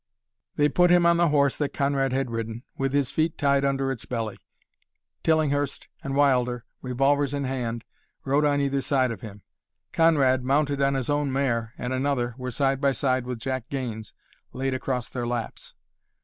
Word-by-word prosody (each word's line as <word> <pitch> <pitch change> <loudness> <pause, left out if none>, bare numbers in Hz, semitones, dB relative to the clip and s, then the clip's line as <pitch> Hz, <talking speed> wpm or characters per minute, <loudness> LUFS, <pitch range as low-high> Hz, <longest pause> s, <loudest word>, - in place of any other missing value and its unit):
They 145 - +4
put 180 +4 +3
him 175 -1 +5
on 170 0 +5
the 175 0 +4
horse 140 -3 +3
that 145 -2 -2
Conrad 140 -1 +1
had 130 -2 -1
ridden, 115 +1 -4
with 135 0 -1
his 140 -2 +1
feet 160 0 0
tied 140 -1 +2
under 135 -1 0
its 130 - -6
belly. 115 -4 -3 0.8
Tillinghurst 145 -3 0
and 135 0 -3
Wilder, 125 -4 +2 0.2
revolvers 135 +2 +1
in 140 - -2
hand, 120 -3 -3 0.4
rode 140 +2 +2
on 145 -1 +2
either 140 -1 0
side 130 -3 +1
of 110 - -7
him. 105 -2 -10 0.5
Conrad, 140 -6 +3
mounted 140 +1 +1
on 140 0 +2
his 135 +1 -1
own 145 -1 0
mare, 120 -4 -1
and 125 +1 -3
another 130 -2 0
were 125 0 -4
side 135 +2 0
by 140 -1 +3
side 130 -2 0
with 125 -1 -3
Jack 130 +1 -4
Gaines 115 -6 -4 0.4
laid 135 +1 -2
across 130 -2 -2
their 120 -2 -4
laps. 120 -1 -5
135 Hz, 175 wpm, -25 LUFS, 125-140 Hz, 0.8 s, him